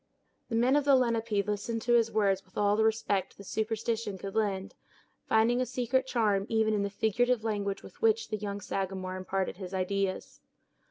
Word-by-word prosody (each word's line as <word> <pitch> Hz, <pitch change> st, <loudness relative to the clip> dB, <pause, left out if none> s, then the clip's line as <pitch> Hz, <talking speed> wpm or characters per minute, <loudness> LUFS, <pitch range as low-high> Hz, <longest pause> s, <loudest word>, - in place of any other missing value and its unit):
The 230 Hz, -, -2 dB
men 245 Hz, +4 st, +3 dB
of 290 Hz, -, +3 dB
the 280 Hz, -1 st, +5 dB
Lenape 230 Hz, -5 st, +1 dB
listened 210 Hz, +2 st, -2 dB
to 240 Hz, -, +2 dB
his 230 Hz, -1 st, +4 dB
words 195 Hz, -3 st, +2 dB
with 185 Hz, -, -17 dB
all 205 Hz, 0 st, +3 dB
the 220 Hz, -, +2 dB
respect 215 Hz, -4 st, 0 dB
that 200 Hz, -, -10 dB
superstition 220 Hz, 0 st, -2 dB
could 195 Hz, +1 st, -6 dB
lend, 200 Hz, -3 st, -1 dB, 0.5 s
finding 230 Hz, +3 st, +3 dB
a -, -, +1 dB
secret 255 Hz, +2 st, 0 dB
charm 210 Hz, -5 st, +1 dB
even 220 Hz, -1 st, +2 dB
in 210 Hz, -, +1 dB
the 200 Hz, -, -1 dB
figurative 220 Hz, +3 st, +1 dB
language 200 Hz, -3 st, -2 dB
with -, -, -14 dB
which 225 Hz, 0 st, +2 dB
the 215 Hz, -, -2 dB
young 205 Hz, -1 st, -5 dB
Sagamore 190 Hz, -1 st, -3 dB
imparted 185 Hz, 0 st, -2 dB
his 190 Hz, -1 st, -6 dB
ideas. 190 Hz, +1 st, -2 dB
215 Hz, 185 wpm, -30 LUFS, 195-230 Hz, 0.5 s, the